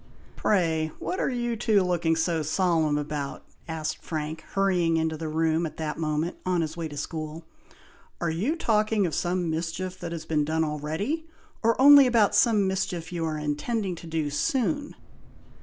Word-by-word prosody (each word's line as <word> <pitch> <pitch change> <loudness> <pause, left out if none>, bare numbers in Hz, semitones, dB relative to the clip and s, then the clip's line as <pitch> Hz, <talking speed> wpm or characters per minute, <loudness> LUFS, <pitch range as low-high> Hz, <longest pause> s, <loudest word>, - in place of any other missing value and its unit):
"Pray! 160 -6 +1
what 370 - -3
are - - +1
you 240 -2 -1
two 215 -3 +3
looking 170 -2 +1
so 160 0 0
solemn 160 -1 +1
about?" 145 -1 -4 0.2
asked 155 -1 -3
Frank, 155 0 -4
hurrying 180 -4 +2
into 160 0 0
the 160 +1 -5
room, 160 +1 +1
at 155 - -11
that 155 -2 -3
moment, 155 +1 -1
on 180 -2 +1
his 160 0 -3
way 165 -1 -3
to 145 -1 -9
school. 155 +2 -5 0.7
"Are 170 -2 0
you 210 - 0
talking 215 - +2
of 165 - -2
some 175 +1 0
mischief 175 +3 -3
that 170 -1 -5
has 165 -2 -5
been 155 -2 +1
done 160 +2 0
already, 160 - -2 0.3
or 230 +1 +2
only 280 0 +9
about 230 -4 +3
some 215 -5 +4
mischief 180 -3 -2
you 170 -2 -3
are 155 -1 -2
intending 180 +8 -2
to 170 - -10
do 160 -3 -2
soon?" 270 - 0
165 Hz, 175 wpm, -26 LUFS, 155-200 Hz, 0.7 s, only